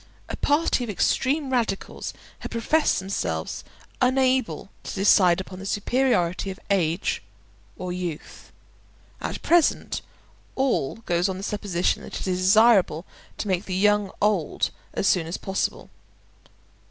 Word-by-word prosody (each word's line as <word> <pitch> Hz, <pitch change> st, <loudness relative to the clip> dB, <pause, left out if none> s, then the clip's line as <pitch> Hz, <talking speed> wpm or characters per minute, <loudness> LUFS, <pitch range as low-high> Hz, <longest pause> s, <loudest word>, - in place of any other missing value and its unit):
A -, -, -3 dB
party 290 Hz, -3 st, +1 dB
of 240 Hz, -, -5 dB
extreme 270 Hz, -, +1 dB
radicals 230 Hz, -6 st, -2 dB, 0.3 s
have -, -, -6 dB
professed 300 Hz, +7 st, +2 dB
themselves 85 Hz, -, -3 dB, 0.4 s
unable 255 Hz, -4 st, +1 dB
to -, -, -7 dB
decide 190 Hz, -3 st, +5 dB
upon 185 Hz, 0 st, -7 dB
the 195 Hz, -, -8 dB
superiority 200 Hz, -5 st, +1 dB
of 190 Hz, -, -7 dB
age 175 Hz, -2 st, +1 dB, 0.6 s
or 180 Hz, -1 st, -4 dB
youth. 175 Hz, -4 st, -6 dB, 0.7 s
At -, -, -4 dB
present 345 Hz, -2 st, +2 dB, 0.5 s
all 260 Hz, -, +1 dB
goes 175 Hz, +2 st, +1 dB
on 185 Hz, -, -3 dB
the 190 Hz, -, -7 dB
supposition 200 Hz, -4 st, -1 dB
that -, -, -7 dB
it -, -, -5 dB
is 180 Hz, -1 st, 0 dB
desirable 195 Hz, -4 st, +5 dB, 0.3 s
to -, -, -4 dB
make 185 Hz, 0 st, 0 dB
the 185 Hz, -, -3 dB
young 205 Hz, +1 st, +3 dB
old 205 Hz, -7 st, +1 dB, 0.2 s
as -, -, -2 dB
soon 175 Hz, -4 st, +3 dB
as 170 Hz, -, -3 dB
possible. 195 Hz, 0 st, -3 dB
195 Hz, 135 wpm, -25 LUFS, 180-240 Hz, 0.7 s, decide